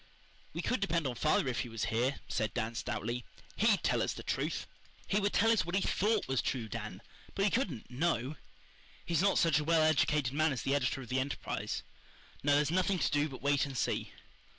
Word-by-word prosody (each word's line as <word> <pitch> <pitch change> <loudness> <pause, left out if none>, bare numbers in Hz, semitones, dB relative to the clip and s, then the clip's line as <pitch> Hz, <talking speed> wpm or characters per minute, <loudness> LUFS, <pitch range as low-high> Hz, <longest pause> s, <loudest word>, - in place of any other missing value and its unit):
"We - - -4
could 250 - 0
depend 170 -5 0
on 130 - -1
father 145 +3 +2
if 125 - -1
he 120 - -3
was 115 -2 -2
here," 125 +5 0
said 110 -2 -1
Dan 115 -1 -1
stoutly. 120 +1 -3 0.3
"HE'D - - +3
tell - - +2
us - - 0
the - - -8
truth." - - -2 0.4
"He 205 - +1
would 205 0 +1
tell 225 +2 +4
us 220 -7 +3
what 175 +2 -3
he 195 - +2
THOUGHT 210 +2 +1
was 130 -2 +1
true, 120 -4 -2
Dan, 110 -2 -6 0.3
but 195 - +2
he 205 - +2
couldn't 180 - -1
KNOW. 135 -1 0 0.7
He's 170 -1 +1
not 200 0 +3
such 165 -3 +4
a - - -2
well 160 0 +3
educated 150 -3 +2
man 155 0 +2
as 130 - -4
the 135 - +1
editor 135 -1 0
of 120 - -12
the 130 +1 +1
Enterprise. 135 +2 -3 0.6
No, 145 0 +3
there's 150 +1 +2
nothing 185 +2 +2
to - - +1
do 145 +1 +2
but 130 -1 -10
wait 140 -1 +2
and 135 -2 -6
see." - - -1
145 Hz, 220 wpm, -33 LUFS, 125-170 Hz, 0.7 s, tell